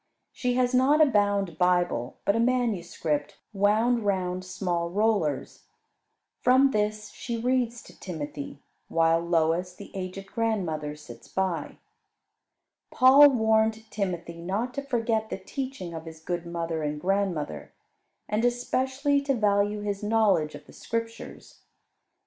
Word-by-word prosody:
She 250 Hz, -1 st, -1 dB
has 250 Hz, 0 st, +2 dB
not 265 Hz, +4 st, +4 dB
a 310 Hz, -, +8 dB
bound 205 Hz, -, +1 dB
Bible, 175 Hz, -9 st, +1 dB
but 200 Hz, -, +3 dB
a -, -, +1 dB
manuscript, 180 Hz, -, -1 dB, 0.2 s
wound 215 Hz, +4 st, +2 dB
round 185 Hz, -2 st, -1 dB
small 175 Hz, -2 st, -2 dB
rollers. 195 Hz, -7 st, 0 dB, 0.7 s
From 260 Hz, +2 st, +4 dB
this 210 Hz, -1 st, -1 dB
she 235 Hz, -2 st, -5 dB
reads 240 Hz, 0 st, 0 dB
to -, -, -16 dB
Timothy; 145 Hz, -5 st, -6 dB, 0.2 s
while 165 Hz, 0 st, +3 dB
Lois, 170 Hz, +1 st, 0 dB
the -, -, -11 dB
aged 190 Hz, +1 st, -5 dB
grandmother, 180 Hz, -9 st, -2 dB
sits 120 Hz, -5 st, -13 dB
by. 180 Hz, +3 st, -2 dB, 1.1 s
Paul 275 Hz, +3 st, +8 dB
warned 220 Hz, -2 st, +1 dB
Timothy 175 Hz, -4 st, -3 dB
not 205 Hz, +8 st, -2 dB
to 280 Hz, -, -3 dB
forget 230 Hz, -5 st, -1 dB
the -, -, -3 dB
teaching 260 Hz, -11 st, -6 dB
of 160 Hz, 0 st, -7 dB
his 160 Hz, -1 st, -9 dB
good 175 Hz, +1 st, -4 dB
mother 165 Hz, -1 st, -3 dB
and 150 Hz, 0 st, -2 dB
grandmother; 180 Hz, -, -1 dB, 0.6 s
and 210 Hz, +2 st, 0 dB
especially 260 Hz, +4 st, +1 dB
to 275 Hz, -1 st, 0 dB
value 205 Hz, -1 st, +1 dB
his 205 Hz, -1 st, -3 dB
knowledge 210 Hz, -8 st, +2 dB
of 145 Hz, -, -12 dB
the -, -, -16 dB
Scriptures. 230 Hz, 0 st, -6 dB
200 Hz, 130 wpm, -27 LUFS, 170-230 Hz, 1.1 s, a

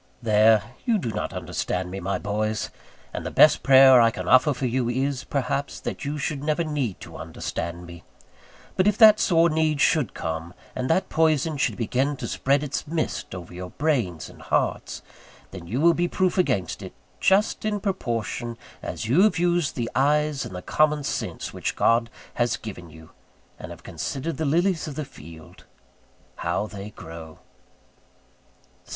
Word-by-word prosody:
There, 110 Hz, -1 st, +4 dB, 0.2 s
you 230 Hz, -2 st, +2 dB
do 120 Hz, -, -3 dB
not 105 Hz, -, -3 dB
understand 90 Hz, 0 st, -3 dB
me, 95 Hz, -, -5 dB
my 95 Hz, +2 st, -2 dB
boys; 105 Hz, +1 st, -2 dB, 0.4 s
and -, -, -4 dB
the -, -, -3 dB
best 155 Hz, -, +5 dB
prayer 130 Hz, -2 st, +8 dB
I 115 Hz, -, +5 dB
can -, -, -6 dB
offer 130 Hz, +4 st, +5 dB
for 130 Hz, -1 st, -3 dB
you 125 Hz, 0 st, 0 dB
is, 130 Hz, +2 st, -1 dB
perhaps, 140 Hz, +1 st, -2 dB
that -, -, -5 dB
you 145 Hz, +1 st, -3 dB
should 145 Hz, -1 st, -3 dB
never 155 Hz, +2 st, 0 dB
need 145 Hz, -, -2 dB
to -, -, -10 dB
understand 85 Hz, +1 st, -5 dB
me: 85 Hz, -1 st, -11 dB, 0.7 s
but 185 Hz, -, +2 dB
if 210 Hz, -, +2 dB
that 215 Hz, -2 st, +8 dB
sore 170 Hz, -4 st, +4 dB
need 155 Hz, -2 st, +1 dB
should 145 Hz, -6 st, +2 dB
come, 80 Hz, +1 st, -5 dB, 0.2 s
and 130 Hz, 0 st, -2 dB
that 185 Hz, +4 st, +1 dB
poison 155 Hz, -1 st, +2 dB
should 140 Hz, -, 0 dB
begin 130 Hz, +5 st, 0 dB
to -, -, -5 dB
spread 140 Hz, +2 st, +1 dB
its 150 Hz, +1 st, -4 dB
mist 160 Hz, -, -3 dB
over 90 Hz, -1 st, -9 dB
your 90 Hz, +1 st, -7 dB
brains 120 Hz, -, -1 dB
and -, -, -15 dB
hearts, -, -, -1 dB, 0.5 s
then 90 Hz, -3 st, -9 dB
you 115 Hz, +9 st, -2 dB
will 170 Hz, +3 st, +5 dB
be 175 Hz, +1 st, 0 dB
proof 185 Hz, 0 st, 0 dB
against 100 Hz, -, 0 dB
it; -, -, -8 dB, 0.3 s
just 200 Hz, +3 st, +2 dB
in 215 Hz, -1 st, -1 dB
proportion 120 Hz, -, -3 dB, 0.2 s
as -, -, -5 dB
you 130 Hz, +11 st, +3 dB
have 215 Hz, -1 st, +4 dB
used 175 Hz, -2 st, +1 dB
the 120 Hz, -3 st, -2 dB
eyes 150 Hz, 0 st, +1 dB
and 90 Hz, -, -8 dB
the 90 Hz, -, -7 dB
common 150 Hz, -1 st, +2 dB
sense -, -, -4 dB
which -, -, -3 dB
God 115 Hz, 0 st, +2 dB, 0.2 s
has 120 Hz, -1 st, 0 dB
given 90 Hz, -6 st, -9 dB
you, 80 Hz, +1 st, -15 dB, 0.5 s
and -, -, -8 dB
have -, -, -11 dB
considered 155 Hz, +5 st, -4 dB
the 160 Hz, -, -1 dB
lilies 170 Hz, +3 st, +1 dB
of 145 Hz, -, -6 dB
the 155 Hz, -, -4 dB
field, 80 Hz, -, -14 dB, 0.7 s
how 85 Hz, +4 st, -1 dB
they 105 Hz, -1 st, -8 dB
grow. 80 Hz, -4 st, -10 dB
130 Hz, 175 wpm, -24 LUFS, 105-155 Hz, 0.7 s, prayer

